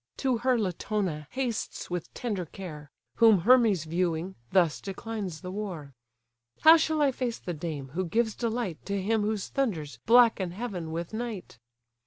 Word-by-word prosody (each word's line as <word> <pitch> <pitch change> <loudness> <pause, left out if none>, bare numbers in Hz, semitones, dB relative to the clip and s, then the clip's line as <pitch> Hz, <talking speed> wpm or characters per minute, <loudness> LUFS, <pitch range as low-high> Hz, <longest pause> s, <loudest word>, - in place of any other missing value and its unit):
To 255 -3 0
her 255 +1 +2
Latona 185 -5 -2
hastes 250 -8 -3
with 175 -2 -4
tender 205 -8 -3
care; 155 -5 -9 0.3
Whom 220 -5 +6
Hermes 225 - +5
viewing, 170 +2 -1 0.2
thus 175 -5 +3
declines 195 -3 -5
the 180 -1 -6
war: 180 -9 -5 0.7
"How 320 +1 +9
shall 315 -2 +2
I 280 - +4
face 245 -2 -3
the 175 - -5
dame, 150 -4 -5
who 180 +7 -2
gives 220 +4 +1
delight 230 -7 -3
To 200 0 -1
him 215 +3 +1
whose 210 -1 -2
thunders 160 - -2
blacken 225 -6 +5
heaven 185 -7 -5
with 170 +4 -4
night? 220 - -5
195 Hz, 155 wpm, -28 LUFS, 170-230 Hz, 0.7 s, How